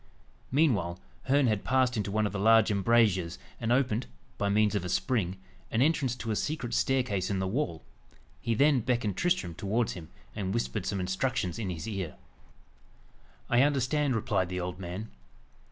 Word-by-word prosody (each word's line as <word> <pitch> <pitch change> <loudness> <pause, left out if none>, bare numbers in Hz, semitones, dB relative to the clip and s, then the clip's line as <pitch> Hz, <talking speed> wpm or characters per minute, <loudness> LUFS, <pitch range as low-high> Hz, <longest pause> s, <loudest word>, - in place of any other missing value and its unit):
Meanwhile, 105 - +2 0.3
Herne 140 +1 +3
had 105 -4 +1
passed 130 -1 +2
into 105 -2 -1
one 110 +2 +1
of 105 - -2
the 100 - -2
large 110 +1 +5
embrasures, 100 -4 +2 0.2
and 115 0 -1
opened, 125 -2 +1 0.3
by 100 - +1
means 105 +1 +3
of 100 - -1
a 90 - -4
spring, 95 -2 0 0.3
an 115 +3 +2
entrance 140 -5 +1
to 115 -2 -4
a - - 0
secret 125 -2 -2
staircase 125 -8 +1
in 100 - 0
the 95 0 -1
wall. 105 - -2 0.6
He 115 - 0
then 140 +2 +4
beckoned 120 -4 0
Tristram 170 - 0
towards 105 +7 -1
him, 80 -3 -9 0.3
and 95 0 -2
whispered 110 -4 -2
some 100 - -1
instructions 95 +1 -1
in 105 -4 -2
his 85 +2 -5
ear. 95 -7 -4 1.3
"I 120 - +4
understand," 140 0 +2
replied 95 -4 0
the 90 0 -3
old 90 0 -4
man. 95 +4 -6
110 Hz, 170 wpm, -29 LUFS, 95-125 Hz, 1.3 s, large